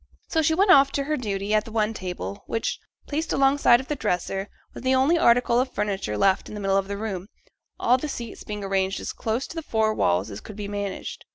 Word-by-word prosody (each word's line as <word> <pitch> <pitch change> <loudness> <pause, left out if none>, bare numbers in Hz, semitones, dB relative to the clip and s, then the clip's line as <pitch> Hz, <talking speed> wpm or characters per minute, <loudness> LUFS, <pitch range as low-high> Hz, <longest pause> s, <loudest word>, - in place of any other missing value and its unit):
So 320 - +2
she 320 +1 +2
went 390 +2 +4
off 275 -4 +7
to 280 - 0
her 305 +2 -1
duty 205 -5 -2
at 215 0 +3
the 225 - -11
one 215 0 +1
table, 180 - -5
which, 225 - -2 0.3
placed 310 +3 -2
alongside 270 -3 +4
of 265 - -7
the 295 - -1
dresser, 195 -4 -2 0.3
was - - -8
the 260 +1 +2
only 270 +6 +4
article 240 -5 +4
of 255 0 0
furniture 195 - -2
left 190 - +2
in - - -8
the - - -5
middle 195 -1 +1
of 195 0 +1
the 200 0 -4
room: 200 -3 -4 0.5
all 250 +2 +3
the 305 - -4
seats 235 -4 -6
being 210 -1 -5
arranged 195 0 0
as - - -5
close 230 +3 -2
to - - -10
the 325 - -3
four 220 -6 +1
walls 90 - +1
as 100 - -7
could 210 - -10
be 205 -1 -5
managed. 205 -1 -5
220 Hz, 240 wpm, -25 LUFS, 195-265 Hz, 0.5 s, off